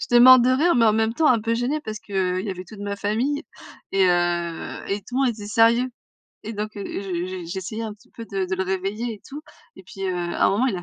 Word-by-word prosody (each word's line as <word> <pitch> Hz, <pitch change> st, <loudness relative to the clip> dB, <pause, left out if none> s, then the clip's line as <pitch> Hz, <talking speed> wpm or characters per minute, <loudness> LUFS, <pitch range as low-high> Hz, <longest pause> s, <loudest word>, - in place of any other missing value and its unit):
J'étais 240 Hz, -, +3 dB
morte 255 Hz, 0 st, +9 dB
de 255 Hz, -, +3 dB
rire 310 Hz, +7 st, +3 dB
mais 235 Hz, -2 st, +4 dB
en 215 Hz, -, +5 dB
même 220 Hz, +1 st, +1 dB
temps 315 Hz, +2 st, +3 dB
un 235 Hz, -3 st, +4 dB
peu 230 Hz, +1 st, 0 dB
gênée, 250 Hz, +6 st, -1 dB
parce 215 Hz, -6 st, -6 dB
qu'il 185 Hz, -2 st, -1 dB
y 210 Hz, -, -3 dB
avait 185 Hz, -1 st, -6 dB
toute 210 Hz, +2 st, -12 dB
ma 200 Hz, 0 st, -3 dB
famille 235 Hz, +9 st, -1 dB, 0.5 s
et 195 Hz, -1 st, +4 dB
heu 175 Hz, -1 st, -1 dB
et 200 Hz, +1 st, -1 dB
tout 250 Hz, -, -9 dB
le 270 Hz, -, +3 dB
monde -, -, +3 dB
était 210 Hz, -3 st, -8 dB
sérieux. 230 Hz, +3 st, +4 dB, 0.6 s
Et 220 Hz, -, -5 dB
donc 215 Hz, +1 st, -5 dB
heu, 200 Hz, -, -5 dB
j -, -, -5 dB
j 185 Hz, -1 st, -4 dB
je -, -, -9 dB
j'essayais 190 Hz, +5 st, -5 dB
un 215 Hz, -, -5 dB
petit 210 Hz, -, -25 dB
peu 230 Hz, -, -9 dB
de 195 Hz, -2 st, -2 dB
de 190 Hz, -, -1 dB
le 190 Hz, -, 0 dB
réveiller 195 Hz, +5 st, -2 dB
et 205 Hz, -, -16 dB
tout. 295 Hz, +2 st, -8 dB, 0.3 s
Et 190 Hz, -, -12 dB
puis, 195 Hz, -, -10 dB
heu, 185 Hz, -, -1 dB
à 175 Hz, -1 st, +1 dB
un -, -, +3 dB
moment 215 Hz, +7 st, +2 dB
il 210 Hz, -8 st, 0 dB
a 175 Hz, -, -6 dB
210 Hz, 275 wpm, -23 LUFS, 190-235 Hz, 0.6 s, morte